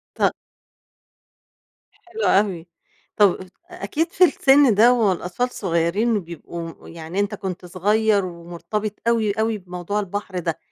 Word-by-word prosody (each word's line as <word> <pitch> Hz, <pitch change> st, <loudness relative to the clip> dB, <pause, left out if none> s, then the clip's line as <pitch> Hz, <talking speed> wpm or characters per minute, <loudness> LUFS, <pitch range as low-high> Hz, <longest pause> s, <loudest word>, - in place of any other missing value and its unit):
ط -, -, +2 dB, 1.6 s
حلو 395 Hz, +6 st, -9 dB
أوي. 190 Hz, -4 st, +2 dB, 0.5 s
طَب 205 Hz, -4 st, +4 dB, 0.3 s
أكيد 345 Hz, -2 st, -2 dB
في 365 Hz, -, +5 dB
السن 280 Hz, -, +5 dB
ده 230 Hz, +5 st, +6 dB
والأطفال 210 Hz, 0 st, 0 dB
صغيرين 190 Hz, +4 st, 0 dB
وبيبقوا 170 Hz, -2 st, -7 dB
يعني 165 Hz, +3 st, -5 dB
أنت 205 Hz, +1 st, -1 dB
كنت 190 Hz, -2 st, -6 dB
صغير 205 Hz, +3 st, +1 dB
ومُرتبط 175 Hz, +4 st, -5 dB, 0.2 s
أوي، 225 Hz, -3 st, +2 dB
أوي 220 Hz, +1 st, -1 dB
بموضوع 180 Hz, +2 st, -4 dB
البحر 195 Hz, -1 st, -5 dB
ده، 165 Hz, -2 st, -2 dB
200 Hz, 120 wpm, -22 LUFS, 175-220 Hz, 1.6 s, ده